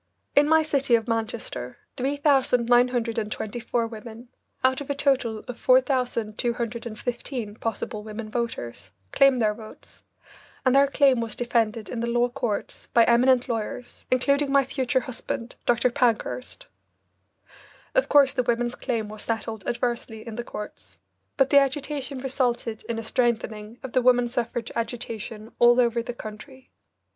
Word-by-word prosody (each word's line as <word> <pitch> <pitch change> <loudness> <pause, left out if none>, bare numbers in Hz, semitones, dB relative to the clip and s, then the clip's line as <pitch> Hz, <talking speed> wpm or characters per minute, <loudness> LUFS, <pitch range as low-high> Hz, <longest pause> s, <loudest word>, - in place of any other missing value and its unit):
In 290 +1 +5
my 320 0 +5
city 275 -5 +2
of 225 0 -1
Manchester 225 0 -3 0.2
3,924 245 -4 +1
women, 230 +1 -9 0.3
out 260 +1 +3
of 285 - -8
a 285 - 0
total 255 -6 +1
of 245 -1 -7
4,215 240 -2 -1
possible 225 -1 -3
women 215 +1 -6
voters, 215 - -4 0.2
claimed 275 -2 +5
their 215 -2 +2
votes, 215 0 -13 0.6
and 255 - +4
their 275 +1 +6
claim 275 -3 +3
was 225 -2 -3
defended 230 -2 0
in 235 - -5
the 235 +1 -1
law 240 +1 +2
courts 240 -5 -3
by 235 - +8
eminent 250 +2 +4
lawyers, 235 +1 -5
including 280 +2 +2
my 275 0 +5
future 260 -1 0
husband, 245 -1 -5
Dr. 240 +1 +3
Pankhurst. 250 -1 -1 1.3
Of - - +2
course 280 -2 +6
the 265 - +1
women's 240 0 0
claim 230 -5 -2
was 215 0 -7
settled 225 -2 -3
adversely 235 -2 -2
in 230 -2 -7
the 240 - -4
courts, 210 -2 -9 0.4
but 270 -1 +3
the 280 - +8
agitation 275 0 -2
resulted 245 -4 -1
in 230 - -1
a 225 - -4
strengthening 225 -2 -1
of 265 - -7
the 255 - +3
woman 245 -1 +4
suffrage 240 -1 -3
agitation 230 -2 -5
all 240 +1 +6
over 235 -1 +2
the 240 +1 -6
country. 250 +5 -10
240 Hz, 140 wpm, -25 LUFS, 225-260 Hz, 1.3 s, by